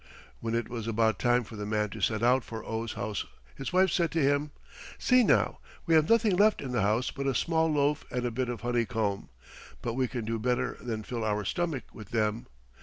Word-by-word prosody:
When 115 0 -2
it 115 - -1
was 115 -2 -5
about 110 0 +1
time 120 0 +3
for 110 - -11
the 105 - -5
man 105 -1 0
to - - -7
set 110 0 +1
out 125 +1 +4
for 115 -1 -7
Oh's 110 0 -3
house 105 0 -3 0.3
his 135 - -5
wife 185 0 +4
said 170 0 +2
to 165 - +1
him, 145 +1 +2 0.5
"See 250 -1 +4
now! - - +2 0.3
we 165 - +2
have 155 -1 +4
nothing 225 -4 +4
left 210 +3 +4
in 135 - -5
the 120 -4 +1
house 110 +5 +1
but 140 0 -4
a 135 - +1
small 160 +3 +2
loaf 145 0 +1
and 125 0 -2
a 120 - -1
bit 125 +2 -2
of 120 -3 -4
honeycomb. 115 -4 -1 0.5
But 120 - -2
we 130 +1 +1
can 120 -3 -4
do 115 0 -2
better 125 +2 0
than 110 -3 -4
fill 115 +1 -4
our 105 -1 -1
stomach 165 - -1
with 105 -3 -11
them. 110 0 -1
120 Hz, 225 wpm, -29 LUFS, 110-145 Hz, 0.5 s, out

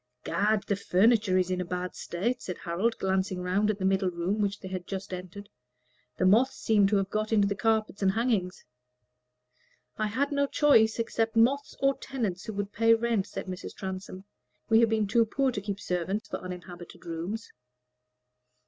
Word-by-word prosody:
"Gad! 205 +5 +1
the 200 - 0
furniture 200 +1 +3
is 185 0 +1
in 180 0 0
a - - -1
bad 180 +1 -4
state," 235 +9 -2
said 180 - -5
Harold, 190 +7 -1
glancing 190 0 0
around 185 +4 +1
at 215 - 0
the 190 - -2
middle 190 0 +2
room 180 +4 -2
which 200 0 -1
they 190 - -8
had 185 -2 -5
just 195 0 -5
entered; 185 +3 -7 0.7
"the 185 - +1
moths 230 +8 +4
seem 210 -3 +3
to 205 - +1
have 195 -1 0
got 215 +1 -1
into 205 -2 +4
the 200 - 0
carpets 215 -1 0
and 190 -1 +3
hangings." 215 -5 -1 1.3
"I 215 - +1
had 270 +7 -1
no 280 0 +1
choice 225 -8 +4
except 225 -1 -1
moths 270 +5 +2
or 275 0 +3
tenants 220 -10 -3
who 220 - -5
would 205 0 -4
pay 230 +1 +5
rent," 225 -3 0
said - - -6
Mrs. 185 0 -7
Transome. 190 -1 -6 0.5
"We 225 0 +6
have 230 -1 +4
been 220 -1 +1
too 230 +3 +3
poor 265 +4 0
to 200 - -4
keep 200 0 -4
servants 190 +2 -2
for - - -4
uninhabited 180 -1 -9
rooms." 175 +7 -5
200 Hz, 185 wpm, -28 LUFS, 185-225 Hz, 1.3 s, We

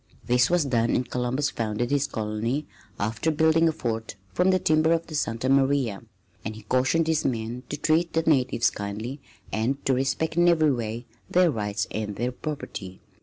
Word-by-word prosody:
This 125 +1 +3
was 175 -3 +2
done 120 -3 +1
and 125 - 0
Columbus 125 +3 -1
founded 115 +2 -2
his 145 0 +2
colony 110 +6 -2 0.3
after 110 +10 -1
building 160 +1 +4
a - - +1
fort 115 -6 -4 0.2
from 180 +1 +3
the 185 - +4
timbers 160 -1 +3
of 165 - -21
the 160 - -10
Santa 115 -4 -1
Maria; 135 -6 +2 0.4
and 110 - -4
he 110 - -11
cautioned 130 +9 +2
his 160 -1 +1
men 115 0 -2
to 145 - -3
treat 160 +3 +1
the 165 - +1
natives 130 -6 +2
kindly 110 +7 -5 0.3
and 125 +6 -1
to 135 - +3
respect 135 +5 -1
in 175 0 +5
every 155 -3 +4
way 115 -1 -3 0.2
their 180 -2 +4
rights 105 -3 -2
and 105 -2 -3
their 120 +4 -1
property. 125 -10 -6
130 Hz, 180 wpm, -26 LUFS, 115-155 Hz, 0.4 s, in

